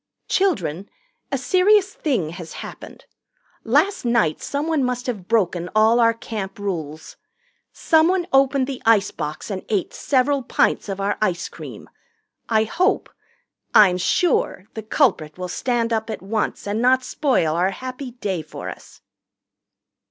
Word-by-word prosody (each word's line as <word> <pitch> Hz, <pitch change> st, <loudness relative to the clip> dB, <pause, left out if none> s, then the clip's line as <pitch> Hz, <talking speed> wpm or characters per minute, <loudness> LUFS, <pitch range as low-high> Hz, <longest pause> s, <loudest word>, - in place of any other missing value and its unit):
"Children, 205 Hz, -, 0 dB, 0.4 s
a 275 Hz, -, +1 dB
serious 385 Hz, +8 st, +3 dB
thing 255 Hz, -, -1 dB
has 170 Hz, -1 st, -9 dB
happened. -, -, -11 dB, 0.6 s
Last 400 Hz, +1 st, +2 dB
night 235 Hz, -10 st, +1 dB
someone 295 Hz, 0 st, -1 dB
must 250 Hz, 0 st, -2 dB
have 210 Hz, -8 st, -4 dB
broken 180 Hz, -6 st, +1 dB
all 220 Hz, +2 st, +5 dB
our 230 Hz, -1 st, +4 dB
Camp 210 Hz, -4 st, -6 dB
rules. 160 Hz, -7 st, -5 dB, 0.5 s
Someone 345 Hz, +2 st, +2 dB
opened 270 Hz, 0 st, +4 dB
the 265 Hz, -1 st, -6 dB
icebox 195 Hz, -7 st, 0 dB
and 190 Hz, -1 st, -4 dB
ate 200 Hz, -5 st, -1 dB
several 275 Hz, +1 st, +1 dB
pints 235 Hz, -, 0 dB
of 195 Hz, 0 st, -4 dB
our 200 Hz, +1 st, -1 dB
ice 185 Hz, -5 st, 0 dB
cream. -, -, -10 dB, 0.6 s
I 220 Hz, -1 st, +3 dB
hope 360 Hz, -, 0 dB, 0.6 s
I'm 185 Hz, -4 st, +7 dB
sure 195 Hz, -, +1 dB
the 220 Hz, -, -5 dB
culprit 215 Hz, -, +1 dB
will 180 Hz, 0 st, -4 dB
stand 235 Hz, +4 st, -1 dB
up 220 Hz, 0 st, -1 dB
at 220 Hz, -, -5 dB
once 215 Hz, +2 st, -2 dB
and 205 Hz, +2 st, -1 dB
not 255 Hz, +1 st, +4 dB
spoil 250 Hz, -, +1 dB
our 180 Hz, +3 st, +2 dB
happy 255 Hz, +4 st, -7 dB
day 195 Hz, -8 st, -3 dB
for 155 Hz, -, -8 dB
us." -, -, -12 dB
225 Hz, 140 wpm, -22 LUFS, 190-270 Hz, 0.6 s, I'm